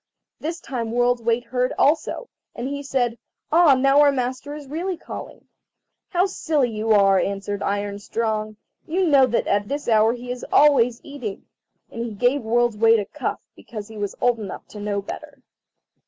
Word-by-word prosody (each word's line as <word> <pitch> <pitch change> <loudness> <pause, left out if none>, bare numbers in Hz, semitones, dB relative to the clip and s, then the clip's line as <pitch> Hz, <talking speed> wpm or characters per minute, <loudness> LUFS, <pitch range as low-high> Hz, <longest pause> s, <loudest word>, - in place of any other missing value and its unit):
This 330 +2 -4
time 235 -4 -4
World's 245 +1 +2
weight 230 +1 +1
heard 250 +1 -1
also, 320 - +1 0.3
and 240 +2 -4
he 285 +1 -4
said, 245 -4 -1 0.3
"Ah, 320 -3 +6
now 275 +2 +4
our 290 -1 +6
master 260 +2 -3
is 300 -1 -9
really 340 +6 -3
calling." - - -9 0.6
"How 360 0 +2
silly 305 -9 0
you 215 +1 -3
are!" 195 -2 +5
answered 200 +1 -3
Iron 205 0 -2
strong; 215 0 -2 0.3
"you 365 +4 +1
know 280 -5 +5
that 235 - 0
at 205 0 +1
this 290 +4 -4
hour 220 0 +4
he 245 0 -7
is 250 -1 -6
always 250 -5 +4
eating." 250 -9 -7 0.5
And 230 - -4
he 235 -2 -5
gave 250 +6 +2
World's 235 0 +1
weight 225 +1 +5
a 205 - -2
cuff, - - -4 0.2
because 215 -2 -9
he 220 - -10
was 205 -1 -3
old 245 -2 +2
enough 205 -3 -7
to 210 - -10
know 205 -1 -2
better. - - -9
240 Hz, 180 wpm, -23 LUFS, 215-280 Hz, 0.6 s, Ah